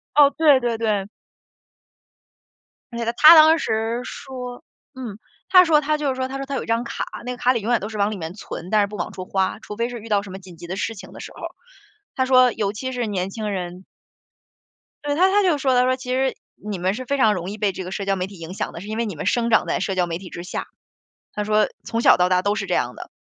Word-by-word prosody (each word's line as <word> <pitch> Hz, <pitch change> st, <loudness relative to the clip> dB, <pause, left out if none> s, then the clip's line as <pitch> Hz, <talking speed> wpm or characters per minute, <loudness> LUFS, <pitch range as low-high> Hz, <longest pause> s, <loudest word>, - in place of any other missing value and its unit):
哦， 285 Hz, -1 st, +7 dB
对， 295 Hz, -5 st, +5 dB
对， 240 Hz, -1 st, -1 dB
对。 210 Hz, -4 st, 0 dB, 1.9 s
而 235 Hz, -, -5 dB
且 235 Hz, -, -2 dB
呢， 230 Hz, -, 0 dB
他 315 Hz, +2 st, +10 dB
当 315 Hz, +1 st, +7 dB
时 225 Hz, +2 st, -1 dB
说 250 Hz, -1 st, -8 dB, 0.3 s
嗯， 235 Hz, -6 st, -7 dB, 0.3 s
他 365 Hz, -1 st, +8 dB
说 310 Hz, -3 st, +4 dB
他 305 Hz, +1 st, 0 dB
就 295 Hz, -2 st, -1 dB
是 -, -, -1 dB
说， 260 Hz, 0 st, -3 dB
他 270 Hz, -, -5 dB
说 275 Hz, -, -4 dB
他 275 Hz, -, -5 dB
有 -, -, -2 dB
一 -, -, -9 dB
张 230 Hz, +1 st, 0 dB
卡， -, -, -4 dB, 0.2 s
那 250 Hz, -, -3 dB
个 245 Hz, -, -8 dB
卡 250 Hz, +1 st, +3 dB
里 230 Hz, -, -2 dB
永 235 Hz, +3 st, 0 dB
远 235 Hz, -, +3 dB
都 205 Hz, -, -5 dB
是 220 Hz, -, -7 dB
往 205 Hz, +1 st, +1 dB
里 205 Hz, -, -5 dB
面 165 Hz, +2 st, -6 dB
存， 180 Hz, -3 st, -8 dB
但 215 Hz, -1 st, +4 dB
是 -, -, +1 dB
不 210 Hz, +1 st, -8 dB
往 175 Hz, -, -3 dB
出 185 Hz, -, -7 dB
花， 190 Hz, 0 st, -1 dB
除 210 Hz, -, -8 dB
非 235 Hz, +1 st, -1 dB
是 245 Hz, -1 st, -6 dB
遇 225 Hz, +1 st, -11 dB
到 205 Hz, -1 st, +3 dB
什 200 Hz, -2 st, -10 dB
么 190 Hz, -, -7 dB
紧 180 Hz, -3 st, -14 dB
急 175 Hz, -, -9 dB
的 185 Hz, +2 st, -5 dB
事 225 Hz, +3 st, -2 dB
情 195 Hz, -, -11 dB
的 -, -, -11 dB
时 -, -, -9 dB
候， -, -, -13 dB, 0.7 s
他 260 Hz, -, 0 dB
说 255 Hz, -1 st, +5 dB
尤 205 Hz, -2 st, -2 dB
其 260 Hz, +4 st, -4 dB
是 245 Hz, -2 st, -2 dB
年 190 Hz, -2 st, -2 dB
轻 215 Hz, 0 st, -4 dB
人 180 Hz, -1 st, -5 dB, 1.2 s
对， 290 Hz, 0 st, -1 dB
他 370 Hz, +4 st, +5 dB
他 410 Hz, +1 st, +3 dB
就 345 Hz, -6 st, +2 dB
说， 265 Hz, -2 st, +1 dB
他 250 Hz, -, +4 dB
说： 255 Hz, 0 st, +2 dB
“其 255 Hz, -1 st, -8 dB
实 265 Hz, 0 st, 0 dB, 0.2 s
你 210 Hz, -2 st, -6 dB
们 185 Hz, +3 st, 0 dB
是 255 Hz, -, -6 dB
非 280 Hz, +3 st, -1 dB
常 215 Hz, -4 st, +4 dB
容 180 Hz, +1 st, -4 dB
易， 210 Hz, -, -7 dB
被 200 Hz, -2 st, +1 dB
这 185 Hz, -, -6 dB
个 185 Hz, -, -7 dB
社 195 Hz, +1 st, -4 dB
交 195 Hz, 0 st, +1 dB
媒 185 Hz, 0 st, -3 dB
体 195 Hz, -2 st, -13 dB
影 165 Hz, +2 st, -8 dB
响 -, -, -4 dB
的， 170 Hz, -, -8 dB
是 200 Hz, -, -9 dB
因 215 Hz, +1 st, -4 dB
为 235 Hz, -, 0 dB
你 205 Hz, -7 st, -5 dB
们 150 Hz, -, -5 dB
生 235 Hz, +3 st, +1 dB
长 225 Hz, -, +4 dB
在 -, -, -1 dB
社 195 Hz, -, -1 dB
交 180 Hz, -1 st, +2 dB
媒 165 Hz, 0 st, -4 dB
体 185 Hz, -1 st, -11 dB
之 175 Hz, -, -7 dB
下。” -, -, -5 dB, 0.7 s
他 210 Hz, -, -2 dB
说： 215 Hz, 0 st, +2 dB
“从 230 Hz, -, -2 dB
小 -, -, +6 dB
到 180 Hz, 0 st, +2 dB
大 180 Hz, 0 st, +3 dB
都 205 Hz, -, +1 dB
是 210 Hz, -1 st, -3 dB
这 180 Hz, -, 0 dB
样 125 Hz, 0 st, -1 dB
的， -, -, -10 dB
220 Hz, 300 characters per minute, -22 LUFS, 195-255 Hz, 1.9 s, 他